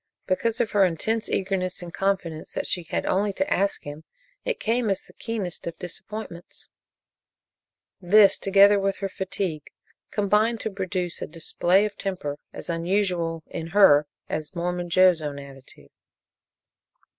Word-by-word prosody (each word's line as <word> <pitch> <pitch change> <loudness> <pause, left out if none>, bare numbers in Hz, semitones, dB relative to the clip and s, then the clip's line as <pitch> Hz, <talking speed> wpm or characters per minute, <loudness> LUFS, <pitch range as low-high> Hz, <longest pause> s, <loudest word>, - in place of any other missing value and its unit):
Because 220 +4 0
of 235 -3 0
her 205 -1 +4
intense 215 +6 0
eagerness 185 -2 -1
and 175 -1 -9
confidence 185 -5 -2
that - - -2
she 180 - -1
had - - -1
only 200 +2 +1
to 285 - -1
ask 200 +2 0
him, 145 +2 -8 0.4
it - - -2
came 230 0 0
as 195 -1 0
the - - -19
keenest 210 -9 -5
of 170 - -5
disappointments. 180 0 -8 1.3
This 200 +2 +6
together 200 +1 +6
with 195 0 0
her 195 - -4
fatigue 185 -5 -4 0.4
combined 210 +3 +2
to 220 - -3
produce 185 -2 -3
a - - -3
display 175 +4 +1
of 205 -1 -6
temper 165 -7 -3
as - - -8
unusual 170 -1 -1
in 165 -1 -6
her 165 -6 +6 0.2
as 155 +4 -4
Mormon 175 0 -2
Joe's 180 -1 +5
own 145 -2 -4
attitude. 135 -1 -13
185 Hz, 145 wpm, -25 LUFS, 170-205 Hz, 1.3 s, This